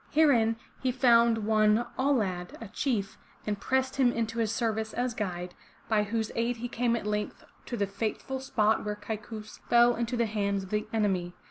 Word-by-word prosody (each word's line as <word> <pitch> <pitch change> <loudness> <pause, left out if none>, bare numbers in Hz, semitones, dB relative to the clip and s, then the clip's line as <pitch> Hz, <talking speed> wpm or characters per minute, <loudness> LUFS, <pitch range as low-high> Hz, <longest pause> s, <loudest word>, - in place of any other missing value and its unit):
Herein 250 -8 +4 0.3
he 260 - +1
found 235 -3 +4
one 215 +1 +3
Au' 275 +2 +1
lad, 185 -8 -1
a 225 - -7
chief, 220 -3 -2 0.3
and 205 -1 -2
pressed 260 +3 0
him 255 -3 +4
into 230 0 -2
his 220 -2 +1
service 220 -2 -1
as 245 0 0
guide, 180 -4 -4 0.3
by 215 -2 +3
whose 220 +1 -2
aid 235 +1 0
he 240 +2 -4
came 235 0 0
at 230 - -4
length 210 0 -2 0.2
to 240 - -3
the 200 - +1
fateful 215 +6 -3
spot 220 -4 +1
where 210 0 -2
Kaikous 215 0 -7
fell 240 0 +6
into 235 +1 -2
the 235 - +2
hands 200 -2 -1
of 190 - -11
the 210 0 -1
enemy. 190 -5 0
225 Hz, 190 wpm, -29 LUFS, 210-240 Hz, 0.3 s, fell